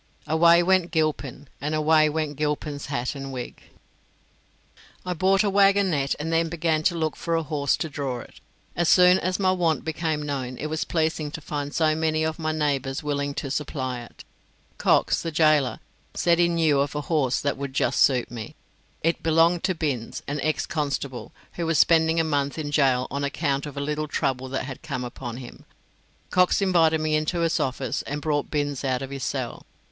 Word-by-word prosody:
"Away 170 +3 +5
went 185 -1 +3
Gilpin, 150 -4 -2
and 150 +2 -1
away 155 0 +4
Went 155 -1 -2
Gilpin's 150 0 -3
hat 125 -3 -2
and 135 -1 -7
wig." 125 -2 -7 1.4
I 180 - -1
bought 190 +3 +3
a - - +1
waggonette, 195 -8 +3
and 160 +2 -2
then 165 0 +2
began 160 -1 0
to 175 - +3
look 160 -2 -1
for 170 - -2
a 165 - 0
horse 145 -2 0
to 160 - -2
draw 140 -5 -4
it. - - -15 0.4
As 170 -2 +1
soon 180 0 +6
as 185 +1 -1
my 190 -2 +2
want 170 -4 0
became 160 -1 -2
known 130 -4 -4
it 155 - -4
was 155 - -1
pleasing 160 -2 -1
to 150 - -7
find 145 -1 -4
so 155 0 +2
many 155 0 0
of 160 0 -2
my 155 -1 -1
neighbours 140 -3 -1
willing 145 -1 -2
to 140 -3 -4
supply 130 -4 -3
it. 120 - -13 0.6
Cox, - - +3
the 165 - -3
gaoler, 155 -6 +3 0.4
said 170 -1 +2
he 175 - +5
knew 160 -4 +2
of 140 +1 -1
a 150 - -1
horse 145 -4 0
that 140 - -1
would 140 -1 -6
just - - +1
suit 125 -4 +3
me. 115 -3 -7 0.5
It 165 +1 +1
belonged 165 +2 +3
to 185 - 0
Binns, 135 -8 -3
an 145 0 -3
ex 155 +1 0
constable, 140 -4 -3 0.2
who 170 -1 -3
was 165 -1 +2
spending 160 +1 +4
a - - +3
month 145 -2 -1
in 150 -2 -4
gaol 130 -4 +3
on 140 +1 -2
account 140 0 -1
of 145 - -9
a - - -1
little 150 +2 -2
trouble 130 -2 -2
that 135 - -2
had 135 -1 -8
come 140 -6 -4
upon 120 -1 -6
him. 125 -2 -10 0.7
Cox 180 0 +3
invited 170 -5 +3
me 155 0 -1
into 155 +3 0
his 165 -1 +1
office, 130 0 -2
and 145 +1 -4
brought 145 -1 -1
Binns 145 -2 -2
out 130 -1 -1
of 135 - -7
his 135 -1 -5
cell. 130 -3 -4
150 Hz, 195 wpm, -25 LUFS, 140-165 Hz, 1.4 s, soon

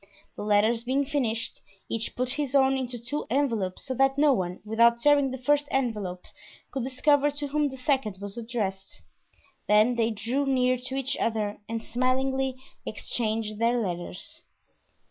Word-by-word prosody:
The - - -7
letters 215 +3 +3
being 265 +3 +1
finished, 250 -6 -2 0.3
each 230 0 -3
put 255 0 -1
his 285 -1 -2
own 270 -1 +5
into 255 -2 -3
two 240 +6 -4
envelopes, 230 -8 0
so 260 - -2
that 270 +1 +2
no 290 -1 +5
one, 180 -5 -2
without 235 +2 +4
tearing 285 +1 +4
the 260 - -4
first 290 +3 +2
envelope, 210 -9 -2 0.5
could 265 -4 -3
discover 285 +3 +3
to 290 0 -4
whom 295 0 +1
the 265 - -9
second 255 -7 0
was 200 0 -6
addressed; 215 -5 -4 0.6
then 215 +4 +5
they 225 -1 +2
drew 235 +6 -1
near 255 -1 +3
to 255 +2 -5
each 270 0 -1
other 215 -2 -1
and 225 0 -3
smilingly 260 +2 0 0.3
exchanged 215 0 -2
their 235 +1 +2
letters. 180 -4 -5
245 Hz, 160 wpm, -27 LUFS, 220-270 Hz, 0.6 s, own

